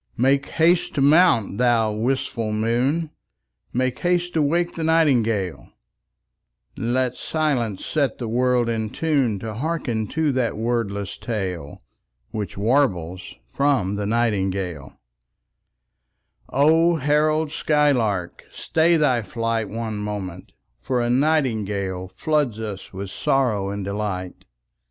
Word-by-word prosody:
Make 135 +3 +2
haste 170 +2 +2
to 140 - +1
mount, 140 - +4
thou 120 -3 +3
wistful 115 0 -1
moon, 125 +9 0 0.6
Make 130 0 -1
haste 175 0 0
to 160 - +2
wake 170 +4 +1
the 165 - -4
nightingale: 120 - +1 1.1
Let 125 +1 0
silence 130 -11 -1
set 140 -7 0
the 120 - -4
world 125 +1 +2
in 110 -2 -1
tune 135 -7 0
To 110 +2 -6
hearken 120 -4 -2
to 155 +3 0
that 125 -5 -1
wordless 110 -4 -2
tale 95 - -4 0.5
Which 105 -3 -5
warbles 95 - 0 0.2
from 135 -9 +1
the 100 0 -2
nightingale 95 -9 -1 1.5
O 160 +5 +4
herald 155 +1 +1
skylark, 125 - +1
stay 165 +1 +2
thy 130 -6 +2
flight 115 -1 -2
One 110 -1 -4
moment, 100 -4 -5 0.3
for 125 - -1
a 120 0 0
nightingale 105 - 0
Floods 150 -8 0
us 105 -4 -6
with 95 0 -6
sorrow 110 -8 0
and 100 -1 -4
delight. 100 -3 -4
120 Hz, 115 wpm, -23 LUFS, 105-145 Hz, 1.5 s, mount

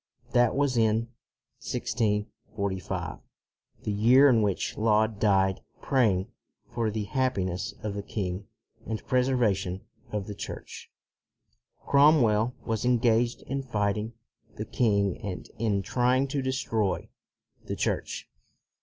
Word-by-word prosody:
1 - - -23
That 120 -1 +4
was 140 -3 +1
in 110 +1 +2 0.5
1645, 105 -4 -3 0.6
the 105 - -2
year 125 +7 +6
in 115 -4 +4
which 100 -3 -1
Laud 110 -1 +2
died 95 -2 +2 0.2
praying 110 -9 +2 0.4
for 115 -2 -1
the 110 0 -2
happiness 100 -6 -1
of 105 -2 -2
the 100 - -3
king 100 -1 -4 0.4
and 110 - -1
the - - -18
preser 130 0 +2
vation 100 -5 0 0.3
of 105 -2 -2
the 105 - -6
Church. - - -8 1.0
Cromwell 125 -6 +4
was 110 -2 -1
en 125 0 +3
gaged 120 0 +1
in 135 +1 -3
fighting 105 -2 -1 0.4
the - - -4
king 100 -5 +1
and 100 -5 -5
in 105 -4 +1
trying 125 +6 +2
to 140 0 -1
destroy 115 -7 -1 0.6
the - - -3
Church. - - -2
110 Hz, 125 wpm, -28 LUFS, 100-125 Hz, 1.0 s, year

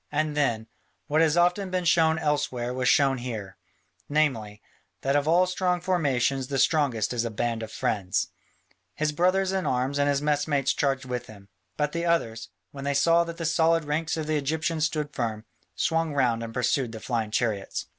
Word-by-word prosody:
And 150 0 -1
then, 120 -7 0 0.4
what 155 +2 +2
has 160 0 +3
often 180 +3 +2
been 185 -1 -1
shown 160 -1 +4
elsewhere 145 -5 -1
was 125 0 +1
shown 135 -2 +3
here, 110 -6 -6 0.5
namely, 125 -9 0 0.4
that 135 +1 0
of 145 +1 +1
all 175 +3 +5
strong 180 -1 0
formations 140 -7 0
the 135 - -2
strongest 135 -6 +2
is 120 -1 0
a 115 - -2
band 115 +1 -2
of 110 - -6
friends. 95 -3 -1 0.7
His 155 0 0
brothers 185 +4 +2
in 190 -1 -1
arms 130 +3 0
and 145 0 +3
his 140 -1 +2
mess 145 0 0
mates 140 -3 +1
charged 135 -2 0
with 125 -1 -4
him, 100 -2 -14 0.3
but 150 0 0
the 170 +1 -2
others, 115 -9 0 0.2
when 140 -1 -8
they 140 0 -1
saw 165 +4 +4
that 170 0 -7
the 165 - -4
solid 165 0 +2
ranks 155 +2 -1
of 160 - -2
the 155 0 0
Egyptians 160 +2 0
stood 150 -2 -3
firm, 110 -3 -3 0.3
swung 165 -2 0
round 120 -4 +2
and 115 0 -5
pursued 125 0 0
the 110 - -6
flying 115 -1 -2
chariots. 105 -3 -2
145 Hz, 190 wpm, -26 LUFS, 120-160 Hz, 0.7 s, all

